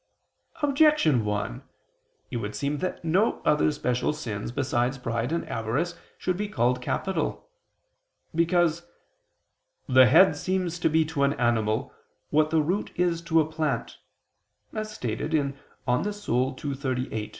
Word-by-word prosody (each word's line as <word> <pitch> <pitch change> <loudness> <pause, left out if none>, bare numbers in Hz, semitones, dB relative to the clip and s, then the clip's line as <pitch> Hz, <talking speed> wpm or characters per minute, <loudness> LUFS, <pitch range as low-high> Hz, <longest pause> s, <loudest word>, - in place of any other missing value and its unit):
Objection 280 - +4
1: 105 -13 -2 0.7
It - - -2
would 105 -2 -4
seem 140 +6 -2
that 185 -2 -4
no 185 +7 +2
other 150 0 +3
special 125 -2 0
sins, 115 -8 -5
besides 130 -1 0
pride 115 +1 -2
and 170 - -2
avarice, 115 +10 -1 0.2
should 185 - -1
be 205 +3 -2
called 125 - +1
capital. 190 +8 -2 0.9
Because 170 0 +2 1.0
"the 130 -1 +7
head 165 +9 +6
seems 185 -2 -2
to - - +2
be 160 +1 +3
to 155 -2 -3
an 140 0 +3
animal, 120 +1 0 0.4
what 155 +1 +3
the 160 -1 +2
root 185 +7 -1
is 175 -1 +1
to 165 -1 +3
a 155 - -1
plant," 155 -6 -2 0.7
as 215 0 -4
stated 150 - -2
in 140 -2 +1
De 140 - -17 0.3
Anima 125 +12 +1 0.2
ii, 130 +3 0 0.2
text. 110 -4 -3
150 Hz, 140 wpm, -26 LUFS, 125-170 Hz, 1.0 s, the